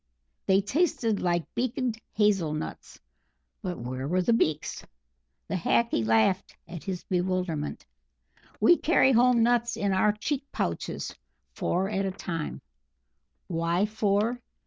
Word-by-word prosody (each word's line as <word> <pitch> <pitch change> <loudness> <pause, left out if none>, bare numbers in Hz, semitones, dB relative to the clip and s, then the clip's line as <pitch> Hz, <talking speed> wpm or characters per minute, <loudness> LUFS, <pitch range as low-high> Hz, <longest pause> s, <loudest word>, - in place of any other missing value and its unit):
They 195 +1 +5
tasted 230 - 0
like 175 -2 +1
beaked 245 -1 -1
hazel 195 -8 +2
nuts, 155 - -7 0.6
but 185 -4 -4
where 130 +3 -4
were 180 +3 +1
the 235 - +3
beaks? 155 -9 0 0.6
The - - -4
Hackee 190 - +1
laughed 110 - +2
at 170 -2 -8
his 185 -3 -4
bewilderment. 180 -4 -2 0.7
"We 345 - +6
carry 300 -5 +4
home 245 -1 +5
nuts 240 0 +2
in 200 -1 0
our 205 +3 +3
cheek 260 +6 -2
pouches, - - -3 0.4
four 185 +2 0
at 195 -1 -1
a - - -1
time 165 -4 -5 0.8
(Why 170 +2 0
four? 215 +2 0
195 Hz, 125 wpm, -27 LUFS, 175-230 Hz, 0.8 s, We